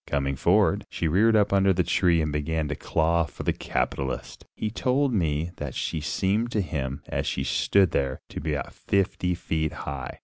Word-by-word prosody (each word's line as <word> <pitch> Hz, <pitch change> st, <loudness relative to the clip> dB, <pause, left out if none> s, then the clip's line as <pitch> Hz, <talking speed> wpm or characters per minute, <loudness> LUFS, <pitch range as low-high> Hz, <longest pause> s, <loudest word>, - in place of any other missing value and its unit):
Coming 70 Hz, -1 st, 0 dB
forward, 100 Hz, +8 st, +2 dB
she 85 Hz, -, -2 dB
reared 105 Hz, +8 st, +4 dB
up 105 Hz, -2 st, +3 dB
under 95 Hz, 0 st, +4 dB
the 90 Hz, 0 st, +1 dB
tree 85 Hz, -2 st, +2 dB
and 75 Hz, -, -1 dB
began 75 Hz, +1 st, -1 dB
to 75 Hz, -, -2 dB
claw 85 Hz, +3 st, +1 dB
for 70 Hz, -, -9 dB
the -, -, +1 dB
capitalist. 65 Hz, +2 st, -3 dB
He 105 Hz, -, -3 dB
told 130 Hz, +3 st, +1 dB
me 80 Hz, -4 st, 0 dB
that 75 Hz, -3 st, -5 dB
she 80 Hz, -, -2 dB
seemed 95 Hz, +10 st, 0 dB
to 105 Hz, -, +2 dB
him, 70 Hz, -6 st, -4 dB
as -, -, -2 dB
she 65 Hz, -, -1 dB
stood 95 Hz, +6 st, +3 dB
there, 65 Hz, -2 st, -1 dB
to -, -, -6 dB
be 80 Hz, 0 st, -1 dB
about 70 Hz, -, -5 dB
fifty 90 Hz, -2 st, 0 dB
feet 80 Hz, -2 st, -2 dB
high. 65 Hz, -2 st, -5 dB
80 Hz, 195 wpm, -26 LUFS, 70-100 Hz, -, reared